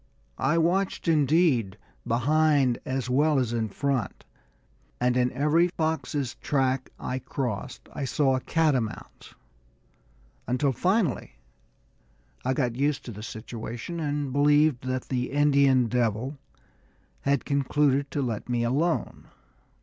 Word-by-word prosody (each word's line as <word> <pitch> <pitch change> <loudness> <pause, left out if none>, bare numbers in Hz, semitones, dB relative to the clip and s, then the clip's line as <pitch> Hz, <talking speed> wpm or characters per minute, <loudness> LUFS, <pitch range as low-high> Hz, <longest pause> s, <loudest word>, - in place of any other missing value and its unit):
I 150 +5 +2
watched 180 +3 0
indeed 150 - +2 0.3
behind 140 +1 +2
as 130 -2 -2
well 145 +4 +2
as 125 -3 0
in 110 -2 -1
front, 130 -1 -2 0.7
and 125 0 +2
in 125 0 +2
every 150 +6 +3
fox's 155 -6 -2
track 130 -2 0
I 130 - -3
crossed 125 -7 -5
I 140 - -3
saw 135 0 +2
a - - 0
catamount's, 130 -7 -2 1.1
until 130 +3 +1
finally 180 - 0 1.1
I 130 +1 0
got 125 -5 0
used 140 +2 0
to 120 - -6
the 105 -1 -9
situation, 115 +8 -6
and 145 -3 -2
believed 145 -2 +3
that 130 -1 -1
the 125 -1 -2
"Indian 140 -3 +4
devil" 120 +3 -1 0.8
had 140 -1 0
concluded 140 0 +1
to 145 - -2
let 115 -2 -4
me 120 -1 0
alone. 145 +8 -1
135 Hz, 120 wpm, -26 LUFS, 125-150 Hz, 1.1 s, Indian